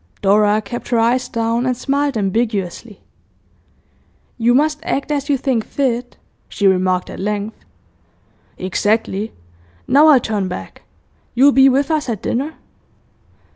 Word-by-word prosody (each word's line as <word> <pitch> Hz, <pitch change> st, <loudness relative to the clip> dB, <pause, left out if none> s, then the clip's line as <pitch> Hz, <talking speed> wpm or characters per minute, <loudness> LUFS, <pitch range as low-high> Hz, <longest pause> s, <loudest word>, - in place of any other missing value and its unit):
Dora 210 Hz, +2 st, +3 dB
kept 240 Hz, +4 st, -7 dB
her 240 Hz, -, +1 dB
eyes 245 Hz, +3 st, +1 dB
down, 230 Hz, +2 st, -1 dB
and 250 Hz, -1 st, 0 dB
smiled 280 Hz, 0 st, -1 dB
ambiguously. 205 Hz, 0 st, -2 dB, 1.4 s
'You 240 Hz, +2 st, +3 dB
must 300 Hz, +2 st, +2 dB
act 280 Hz, -3 st, -2 dB
as 285 Hz, 0 st, -2 dB
you 280 Hz, -, +3 dB
think 255 Hz, -4 st, -1 dB
fit,' 245 Hz, -2 st, -2 dB, 0.3 s
she 200 Hz, -, -2 dB
remarked 185 Hz, -1 st, +2 dB
at -, -, -9 dB
length. 210 Hz, +2 st, -4 dB, 0.9 s
'Exactly. 205 Hz, +2 st, -1 dB, 0.6 s
Now 295 Hz, +4 st, +5 dB
I'll 290 Hz, -4 st, +7 dB
turn 210 Hz, -5 st, -2 dB
back. 180 Hz, -, -8 dB, 0.5 s
You'll 275 Hz, +4 st, +6 dB
be 270 Hz, 0 st, +6 dB
with 275 Hz, +4 st, +1 dB
us 305 Hz, -4 st, -1 dB
at 220 Hz, -4 st, -4 dB
dinner? 285 Hz, +6 st, -2 dB
235 Hz, 135 wpm, -18 LUFS, 210-270 Hz, 1.4 s, I'll